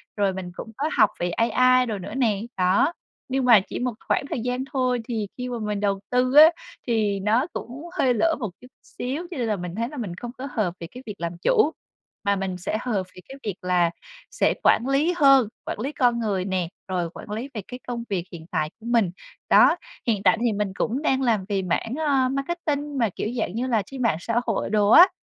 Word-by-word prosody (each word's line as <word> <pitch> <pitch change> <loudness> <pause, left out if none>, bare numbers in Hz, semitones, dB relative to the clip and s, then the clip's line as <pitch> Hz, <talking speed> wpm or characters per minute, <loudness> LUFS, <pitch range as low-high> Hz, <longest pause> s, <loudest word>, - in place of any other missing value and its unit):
rồi 200 -2 +1
mình 185 -1 -6
cũng 225 - -8
có 295 +3 0
học - - +6
về 175 - 0
AI 255 +6 +3
đồ 220 -4 -3
nữa 185 - -7
nè. 220 -7 +1 0.2
Đó, 185 - +3 0.4
nhưng 265 0 0
mà 235 -4 +8
chỉ - - -5
một 250 -1 -1
khoảng - - +2
thời - - -2
gian 250 +2 -2
thôi, 255 -2 +1
thì 220 -4 -2
khi 250 0 -4
mà 240 -1 -4
mình 210 -2 -2
đầu 200 -1 0
tư 250 +1 +2
á 300 +2 +11 0.4
thì 215 -4 +1
nó 220 +8 +2
cũng 255 +6 -7
hơi 255 -2 +3
lỡ 325 +8 +2
một 220 -6 -2
chút 250 - -13 0.2
xíu, 285 +8 -5
cho 345 - -5
nên 240 -3 -1
là 215 - +1
mình 180 -2 -6
thấy 230 +2 -2
là 300 - -9
mình 200 -8 -4
không 240 +6 -7
có 270 - -5
hợp 210 -8 0
về 170 - -6
cái 250 +1 -10
việc 210 - -6
làm 170 0 -4
chủ, 435 - +3 0.5
mà 200 -1 +2
mình 190 -2 -3
sẽ 185 +4 -2
hợp 215 -7 -1
về 185 - -11
cái 270 - -9
việc 205 -4 -3
là 180 -2 +2 0.4
sẽ - - +2
quản 240 - +4
lý 285 +6 +2
hơn, 275 -6 +6 0.2
quản - - -4
lý 265 +6 -2
con 245 -5 +2
người 200 -5 -1
nè, 185 -3 -1 0.2
rồi 180 -3 -1
quản 185 - -10
lý 230 +6 -4
về 215 - -4
cái 250 - -8
công 240 -1 -3
việc 190 -4 -1
hiện 165 -3 -9
tại 155 - 0
của 225 - -14
mình. 230 -6 +2 0.4
Đó, - - +6 0.3
hiện 210 -4 +1
tại 225 - +5
thì 235 -2 +2
mình 205 -2 -2
cũng 245 +7 -1
đang 270 -3 +1
làm 225 -7 +1
về 200 -2 0
mảng, 185 +5 -1
ờ, 265 -3 +3
marketing 290 0 -2
mà, 230 -4 +2
kiểu - - -2
dạng 195 - -2
như 245 +3 -1
là, 230 -4 +2
trên 270 +3 -7
mạng 230 -10 +2
xã 230 +6 0
hội 225 -4 -1
đồ 210 -1 +3
á. 345 - +9
230 Hz, 240 wpm, -24 LUFS, 195-255 Hz, 0.5 s, á